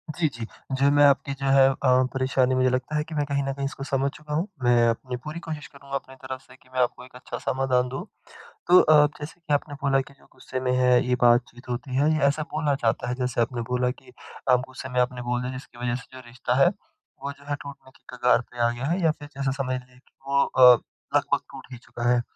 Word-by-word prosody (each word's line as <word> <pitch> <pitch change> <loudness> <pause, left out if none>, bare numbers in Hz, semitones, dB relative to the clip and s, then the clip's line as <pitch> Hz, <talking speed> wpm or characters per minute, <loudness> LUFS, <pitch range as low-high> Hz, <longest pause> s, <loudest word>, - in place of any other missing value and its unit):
जी, 170 -2 +2
जी। 115 -5 -6 0.3
जो 135 +1 +3
मैं 145 0 +5
आपकी 140 0 +3
जो 135 0 -6
है 135 -1 +7
अ, - - -4 0.4
परेशानी 130 -1 +1
मुझे 130 0 +3
लगता 130 +4 -2
है 150 - +1
कि 160 0 -9
मैं 145 -1 0
कहीं 140 0 -1
न 135 - -2
कहीं 140 0 -4
इसको 135 0 -5
समझ 135 0 0
चुका 150 0 -8
हूँ। 165 +6 0 0.2
मैं 120 -1 +4
अपनी 125 +2 -3
पूरी 155 +2 -6
कोशिश 155 -3 -6
करूँगा 140 -1 -9
अपनी 130 -1 -6
तरफ 130 0 -7
से 130 -1 -18
कि 130 - -25
मैं 130 - -2
आपको 125 0 -1
एक 125 - -18
अच्छा 125 - -7
समाधान 130 -1 0
दूँ। 130 +7 -5 0.6
तो 180 - +8
अ, 150 -1 +6
जैसे 150 +3 -8
कि 165 -3 -3
आपने 145 +1 0
बोला 135 -1 +3
कि 140 - -13
जो 140 - -24
गुस्से 130 0 -6
में 130 0 -1
है 125 -1 +4
ये 125 - +2
बातचीत 120 +1 +2
होती 125 +2 -4
है 145 +4 +3
ये 155 - 0
ऐसा 145 +2 0
बोला 150 -2 +1
जाता 115 +2 +1
है। 125 - -1
जैसे 125 -2 -1
आपने 120 +1 -1
बोला 125 0 +1
कि 125 0 -15 0.4
आप 125 - +6
गुस्से 130 0 -8
में 125 -1 -1
आपने 125 0 -2
बोल 120 0 -1
दिया 125 +1 -3
जिसकी 130 -1 -10
वज़ह 120 0 -1
से 130 - -14
जो - - -9
रिश्ता 120 +1 -3
है - - +7 0.6
वो 140 - -3
जो 140 0 -15
है 145 - -1
टूटने 140 -2 -11
की 130 - -26
कगार 125 0 +3
पे 120 - -11
आ - - +3
गया 120 +2 -5
है 175 +6 0
या 160 - +4
फिर 145 -1 -10
जैसे 135 -1 -1
समझ 130 -2 -1
लें 125 0 -20
कि - - -32
वो 140 0 +3
अ, 125 -1 +8 0.4
लगभग - - +2
टूट - - -11
ही 125 - -7
चुका 120 0 -3
है। 120 0 +3
130 Hz, 255 wpm, -25 LUFS, 125-140 Hz, 0.6 s, तो